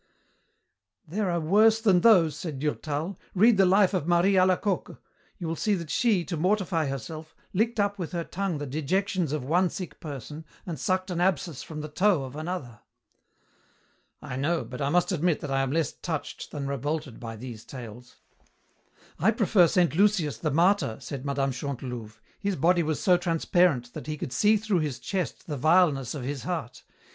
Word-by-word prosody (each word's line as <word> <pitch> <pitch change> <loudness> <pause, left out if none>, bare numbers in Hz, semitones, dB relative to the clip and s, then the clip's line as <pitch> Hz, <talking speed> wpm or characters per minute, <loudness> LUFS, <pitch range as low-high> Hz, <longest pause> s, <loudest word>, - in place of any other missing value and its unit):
"There 195 +4 -1
are 170 -1 0
worse 215 +7 +4
than 195 -6 +4
those," 175 -9 +5
said 155 -6 -5
Durtal. 155 +4 -3 0.2
"Read 215 +3 +5
the 195 -1 +5
life 195 +1 +4
of 175 -4 -1
Marie 175 +3 +4
Alacoque. 185 +1 +1 0.4
You 175 - -5
will 165 - -2
see 210 +4 +1
that 170 -4 -6
she, 210 -8 +2
to 175 - -3
mortify 180 -2 +1
herself, 155 +4 -6 0.2
licked 225 +4 0
up 205 0 0
with 175 - -4
her 170 -2 -2
tongue 190 -1 -3
the 145 - -4
dejections 165 +4 -1
of 150 -3 -2
one 175 +7 +2
sick 185 0 -7
person 150 +1 -7 0.2
and 170 -4 -5
sucked 185 0 -1
an 175 -1 -1
abscess 170 -5 0
from 155 -1 -7
the 150 - -5
toe 175 0 +2
of 130 +1 -8
another." 155 - -5 1.4
"I 125 - -5
know, 160 +5 0
but 125 +3 -8
I 140 - +1
must 175 +5 +2
admit 170 -2 +1
that 145 - -5
I 135 0 +2
am 135 -1 -1
less 160 0 0
touched 160 -4 -5
than 140 -2 -5
revolted 140 0 -3
by 115 -1 -6
these 115 -1 -8
tales." 120 -1 -10 1.0
"I 185 - +4
prefer 210 -5 +4
Saint 175 -1 +2
Lucius 180 - +2
the 155 - -1
martyr," 170 - +2
said 135 +1 -6
Mme. 140 -1 0
Chantelouve. 125 -4 -6 0.2
"His 200 -2 -1
body 175 +4 +3
was 155 -2 -1
so 180 -2 +4
transparent 165 -6 +1
that - - -8
he 155 0 -3
could 145 -4 -5
see 215 +1 +4
through 210 -4 0
his 150 -5 -2
chest 190 -3 -4
the 150 -3 -4
vileness 155 -3 +3
of 140 - -5
his 135 +1 -4
heart. - - -5
165 Hz, 185 wpm, -27 LUFS, 140-185 Hz, 1.4 s, those